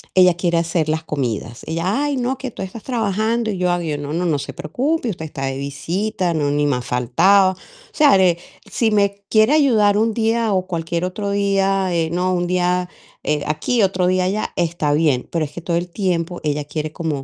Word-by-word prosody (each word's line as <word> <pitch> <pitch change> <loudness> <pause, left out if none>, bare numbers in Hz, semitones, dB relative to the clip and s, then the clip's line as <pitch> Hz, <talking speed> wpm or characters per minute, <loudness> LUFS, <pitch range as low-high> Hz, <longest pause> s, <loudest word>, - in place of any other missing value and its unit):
ella 180 -2 +6
quiere 175 -1 0
hacer 165 -2 -1
las 160 0 -1
comidas. 120 -6 -3
Ella: 185 - -1
"Ay, 290 -1 0
no, 255 +1 -1
que 265 -2 -5
tú - - -9
estás 190 +3 -7
trabajando" 225 -1 0
y 190 - -4
yo: 180 -1 +1
"Ay, 165 -4 -1
no, 145 +1 -5
no, 175 +2 -1
no 150 -3 +1
se 140 - -6
preocupe, 255 - -1
usted 160 -5 -5
está 140 -3 -5
de 135 0 -3
visita, 175 +7 -2
no, 145 -2 0
ni 145 0 +1
más 125 -3 -1
faltaba". 185 +11 +3
O - - -17 0.4
sea, 295 -7 +5
eh, 175 -2 +3 0.3
si 225 -2 +1
me 200 -1 +1
quiere 215 +6 +4
ayudar 220 -9 +4
un 225 0 +2
día 225 -1 +1
o 185 0 0
cualquier 170 0 -2
otro 200 +2 -3
día, 195 -2 +1
eh, 165 -1 +1
¿no? 180 +1 0
Un 175 0 0
día, 180 0 0 0.3
eh, 150 -1 0
aquí, 185 +10 0
otro 185 -1 +1
día 185 0 +2
allá, 205 +3 -2
está 165 -4 0
bien, 150 -5 +1
pero 165 -2 0
es 145 - -10
que 170 - -8
todo 170 0 -1
el 175 +1 -3
tiempo 175 -2 -2
ella 150 -1 -1
quiere 155 +1 -4
como 155 -5 -3
180 Hz, 210 wpm, -20 LUFS, 155-205 Hz, 0.4 s, ella